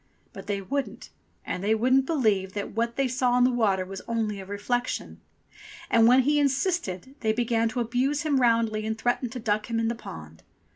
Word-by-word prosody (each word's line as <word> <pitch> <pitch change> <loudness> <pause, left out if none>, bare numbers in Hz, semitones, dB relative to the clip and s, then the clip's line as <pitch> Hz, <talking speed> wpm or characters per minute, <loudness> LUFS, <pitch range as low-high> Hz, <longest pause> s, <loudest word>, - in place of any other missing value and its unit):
But - - -10
they 200 -1 -2
wouldn't, 235 +1 -4 0.3
and 180 - -4
they 215 +2 +3
wouldn't 255 +4 +3
believe 210 - +1
that 205 -1 -4
what 230 +2 -1
they 275 -1 +1
saw 250 0 +1
in 250 - +4
the 255 - +4
water 200 -6 +1
was 195 +1 -7
only 220 -3 -1
a 190 - -8
reflection. 245 +5 -3 0.7
And 230 0 +6
when 250 +2 +6
he 295 +3 +2
insisted 275 - -1
they 220 -1 +1
began 230 -1 +1
to 250 +2 -3
abuse 255 +5 0
him 285 -4 +1
roundly 230 -2 +2
and 220 0 -2
threaten 245 +2 0
to 250 - -6
duck 215 0 -1
him 230 -1 0
in 225 0 +1
the - - 0
pond. 80 - -10
230 Hz, 200 wpm, -26 LUFS, 210-255 Hz, 0.7 s, And